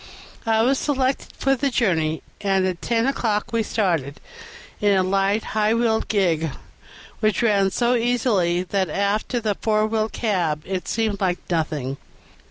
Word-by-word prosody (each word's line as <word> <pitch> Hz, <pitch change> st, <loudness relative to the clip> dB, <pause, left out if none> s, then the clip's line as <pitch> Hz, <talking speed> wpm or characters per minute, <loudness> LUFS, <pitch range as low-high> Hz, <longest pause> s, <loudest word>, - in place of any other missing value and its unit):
I 225 Hz, 0 st, +3 dB
was 265 Hz, +3 st, +2 dB
selected 270 Hz, -2 st, 0 dB
for 270 Hz, 0 st, +2 dB
the 280 Hz, +2 st, 0 dB
journey, 165 Hz, -11 st, 0 dB, 0.2 s
and 195 Hz, -2 st, +2 dB
at 180 Hz, -2 st, -2 dB
ten 230 Hz, 0 st, +1 dB
o'clock 230 Hz, -5 st, -1 dB
we 230 Hz, -, +2 dB
started, 170 Hz, -, -1 dB, 0.6 s
in 205 Hz, -2 st, +4 dB
a 185 Hz, -, +3 dB
light, 195 Hz, +3 st, +1 dB
high 215 Hz, +1 st, +2 dB
wheeled 230 Hz, -1 st, +1 dB
gig, 170 Hz, -6 st, +1 dB, 0.7 s
which 215 Hz, +2 st, +1 dB
ran 200 Hz, -4 st, +3 dB
so 240 Hz, +5 st, +1 dB
easily 225 Hz, -8 st, +1 dB
that 190 Hz, -1 st, -1 dB
after 200 Hz, -, 0 dB
the 215 Hz, -3 st, 0 dB
four 215 Hz, +1 st, +1 dB
wheeled 220 Hz, 0 st, -1 dB
cab 175 Hz, -9 st, -1 dB
it 185 Hz, -1 st, -4 dB
seemed 215 Hz, -3 st, -1 dB
like 180 Hz, -2 st, +1 dB
nothing. 150 Hz, -5 st, -1 dB
210 Hz, 155 wpm, -22 LUFS, 185-230 Hz, 0.7 s, in